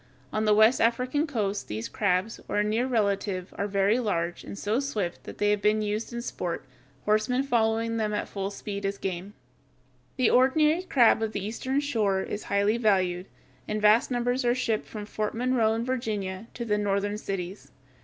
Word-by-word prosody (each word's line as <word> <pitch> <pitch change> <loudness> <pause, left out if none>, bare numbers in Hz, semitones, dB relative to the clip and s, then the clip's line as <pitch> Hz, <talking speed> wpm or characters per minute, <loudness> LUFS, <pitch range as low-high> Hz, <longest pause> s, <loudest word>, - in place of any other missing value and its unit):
On 215 0 0
the 210 -1 +5
West 220 +4 +5
African 250 +6 +1
coast 210 -7 -2
these 110 +2 -4
crabs, 200 +2 0
or - - -2
a 210 - +3
near 220 +4 0
relative, 200 -5 -1
are 200 - -2
very 200 +3 +2
large, 175 -7 -1
and - - -8
so 210 +4 0
swift 215 -11 -3
that - - -8
they 205 0 +2
have 210 -1 +1
been 210 +1 +2
used 210 +3 -2
in 235 0 -4
sport, 175 - -4 0.4
horsemen 215 +5 +2
following 230 -3 +1
them 215 -1 0
at 210 - -2
full 195 -1 -3
speed 200 0 -6
as 200 0 -1
game. 190 +2 -5 0.8
The 255 -3 +3
ordinary 300 +6 +4
crab 245 -11 +4
of 220 -1 -1
the 200 -1 -3
Eastern 260 +6 -1
shore 210 -9 0
is 210 - -5
highly 200 +3 +2
valued, 185 -5 +1 0.4
and 215 0 -1
vast 210 +2 +5
numbers 245 +1 0
are 240 0 +2
shipped 230 -4 -1
from 210 -2 -7
Fort 215 +1 -3
Monroe 235 -2 +2
in 230 +1 -2
Virginia 220 -6 -3
to 235 - -4
the 210 -2 +1
northern 205 0 0
cities. 195 -1 -5
215 Hz, 185 wpm, -27 LUFS, 200-235 Hz, 0.8 s, the